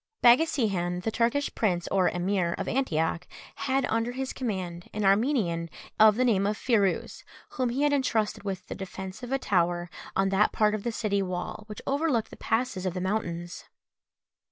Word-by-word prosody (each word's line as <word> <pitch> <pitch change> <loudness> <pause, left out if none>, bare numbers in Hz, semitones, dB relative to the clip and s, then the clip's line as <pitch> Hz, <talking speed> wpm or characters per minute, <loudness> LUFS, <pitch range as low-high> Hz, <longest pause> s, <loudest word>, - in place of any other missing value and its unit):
Baghasihan, 215 - +3
the 225 - -1
Turkish 240 +6 0
prince 180 -6 0
or 190 -2 +3
emir 180 -1 0
of - - -4
Antioch, 170 -8 0 0.3
had 270 -1 0
under 230 +2 -1
his 265 +1 -3
command 185 -8 -4
an 210 -1 0
Armenian 195 - +2 0.3
of 215 -1 +7
the 255 +3 +2
name 200 -5 +3
of 210 +1 -1
Phirouz, 210 -7 0 0.3
whom 255 -2 -1
he 265 +5 0
had 295 0 +3
entrusted 230 -6 0
with 190 -2 -4
the - - -6
defence 190 +2 -7
of 245 0 -7
a 270 - +2
tower 175 -6 0 0.2
on 195 0 +2
that 195 +2 +3
part 210 -1 +3
of 215 - -2
the 235 - -2
city 205 -3 0
wall 185 +3 -4
which 210 - -8
overlooked 280 -5 0
the - - -9
passes 225 -5 -1
of 180 - -3
the - - -2
mountains. 175 -3 -3
210 Hz, 180 wpm, -28 LUFS, 185-240 Hz, 0.3 s, of